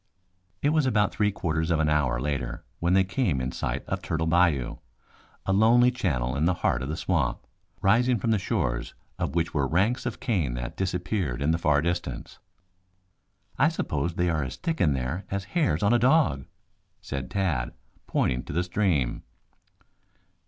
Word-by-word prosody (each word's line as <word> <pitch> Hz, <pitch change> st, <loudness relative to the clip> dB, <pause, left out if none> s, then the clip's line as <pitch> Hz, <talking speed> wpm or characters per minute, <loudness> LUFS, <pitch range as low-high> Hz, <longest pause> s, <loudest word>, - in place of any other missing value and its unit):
It 145 Hz, -, +4 dB
was 155 Hz, -3 st, +2 dB
about 105 Hz, -5 st, +2 dB
three 105 Hz, -1 st, +1 dB
quarters 80 Hz, -4 st, -1 dB
of 85 Hz, -2 st, +2 dB
an 80 Hz, -, +2 dB
hour 70 Hz, -5 st, +1 dB
later 65 Hz, -3 st, -3 dB, 0.2 s
when 85 Hz, +2 st, +1 dB
they 95 Hz, -, +5 dB
came 95 Hz, -, 0 dB
in 65 Hz, +1 st, -2 dB
sight -, -, -3 dB
of -, -, -3 dB
Turtle 80 Hz, 0 st, -2 dB
Bayou, 80 Hz, -6 st, +2 dB, 0.7 s
a 95 Hz, -, +1 dB
lonely 120 Hz, +5 st, +5 dB
channel 70 Hz, -, -1 dB
in 75 Hz, +3 st, +1 dB
the 90 Hz, +1 st, +2 dB
heart 60 Hz, -, +2 dB
of 65 Hz, -, -4 dB
the 80 Hz, -, -3 dB
swamp, 80 Hz, -10 st, -1 dB, 0.4 s
rising 120 Hz, +5 st, +4 dB
from 110 Hz, +3 st, 0 dB
the 110 Hz, -, +2 dB
shores -, -, -2 dB, 0.2 s
of -, -, -2 dB
which 85 Hz, 0 st, 0 dB
were 70 Hz, -3 st, +1 dB
ranks 95 Hz, -, +1 dB
of -, -, -5 dB
cane 85 Hz, -, 0 dB
that -, -, -5 dB
disappeared 90 Hz, -, -2 dB
in 70 Hz, +3 st, +1 dB
the 80 Hz, -, 0 dB
far 75 Hz, -3 st, +2 dB
distance. 85 Hz, +1 st, -3 dB, 1.2 s
"I -, -, +5 dB
suppose 75 Hz, +3 st, -2 dB
they 90 Hz, 0 st, +1 dB
are 80 Hz, -3 st, 0 dB
as 65 Hz, -1 st, -5 dB
thick 165 Hz, -1 st, -3 dB
in 75 Hz, -4 st, +4 dB
there 65 Hz, +8 st, -3 dB
as 100 Hz, 0 st, -2 dB
hairs 140 Hz, -, +1 dB
on 105 Hz, +3 st, +4 dB
a 120 Hz, -, +4 dB
dog?" 125 Hz, -, +3 dB, 0.5 s
said 65 Hz, -2 st, -5 dB
Tad, 85 Hz, -11 st, -1 dB, 0.4 s
pointing 60 Hz, -1 st, 0 dB
to -, -, -6 dB
the 85 Hz, +4 st, +1 dB
stream. 90 Hz, -9 st, 0 dB
85 Hz, 180 wpm, -26 LUFS, 70-100 Hz, 1.2 s, they